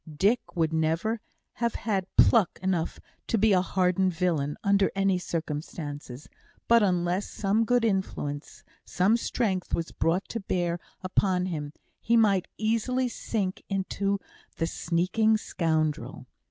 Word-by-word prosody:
Dick 210 +8 +4 0.2
would 160 -2 +1
never 165 +8 0 0.4
have 235 -1 0
had 195 -4 -1
"pluck" 220 -7 +5
enough 180 -3 -1 0.3
to 230 - +1
be 215 0 +4
a 185 - +4
hardened 185 0 +1
villain, 160 -5 0
under 200 0 +3
any 195 -2 +2
circumstances; 150 -5 -5 0.4
but, 235 0 +6
unless 180 0 +1
some 210 +3 +1
good 245 0 +2
influence, 175 -8 -3 0.2
some 195 +5 +2
strength, 210 -5 -1
was 165 - -4
brought 175 +4 0
to 230 - -3
bear 175 -3 -1 0.2
upon 185 -1 +1
him, 150 -5 -4 0.3
he 235 +1 +2
might 200 -5 +3
easily 230 +4 0
sink 205 -5 -3
into 195 +1 -1 0.4
the 165 - +1
sneaking 185 +7 +1
scoundrel. 160 -6 -1
185 Hz, 130 wpm, -27 LUFS, 170-215 Hz, 0.4 s, but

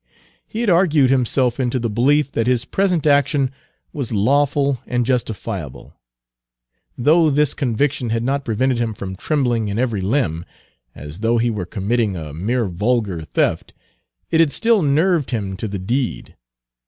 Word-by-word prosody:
He 220 - -4
had 235 - +1
argued 160 -7 +4
himself 125 -1 +1
into 130 0 0
the 120 -1 -1
belief 140 +6 +2
that 115 0 -1
his 125 -1 +1
present 180 -2 0
action 140 -2 +2 0.4
was 135 -6 -4
lawful 140 +4 +1
and 125 -1 0
justifiable. 110 - -4 1.0
Though 155 +5 +4
this 145 0 +2
conviction 135 0 -1
had 115 +1 -1
not 140 +2 -1
prevented 125 +2 0
him 115 -2 -2
from 95 -1 -6
trembling 120 - 0
in 100 +1 -3
every 115 -5 0
limb, 95 - 0 0.5
as 75 +5 -9
though 115 +2 +1
he 120 +1 +1
were 100 -5 -4
committing 105 +1 -1
a 80 -4 -7
mere 115 +9 -1
vulgar 100 -1 -1
theft, 80 - -1 0.6
it 160 - +3
had 165 -3 +4
still 230 +2 +2
nerved 155 +1 +2
him 100 -6 -3
to 110 - -4
the 100 -1 -4
deed. 120 +7 -3
125 Hz, 155 wpm, -20 LUFS, 110-140 Hz, 1.0 s, argued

